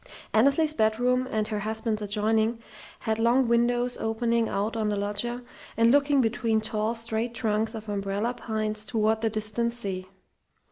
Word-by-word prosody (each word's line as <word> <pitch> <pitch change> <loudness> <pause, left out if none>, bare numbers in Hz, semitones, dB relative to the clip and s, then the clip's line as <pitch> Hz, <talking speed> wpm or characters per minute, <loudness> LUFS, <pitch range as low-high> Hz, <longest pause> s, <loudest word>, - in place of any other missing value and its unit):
Annesley's 280 +7 +3
bedroom 245 +2 +1
and 215 -1 -1
her 210 -2 -2
husband's 220 +1 -2
adjoining 220 +2 +1 0.4
had 220 0 -1
long 240 +3 +3
windows 240 +1 +2
opening 230 +1 0
out 210 +3 -1
on 215 -2 0
the 205 - 0
loggia 210 +5 -2 0.3
and 230 +1 +5
looking 285 0 +4
between 225 -1 +1
tall, 215 +1 -1
straight 230 +1 -3
trunks 220 -1 0
of 220 0 -8
umbrella 200 +3 -2
pines 215 -3 -2
toward 220 0 0
the 225 - +1
distant 220 +2 0
sea. 190 -5 -5
225 Hz, 150 wpm, -27 LUFS, 215-235 Hz, 0.4 s, and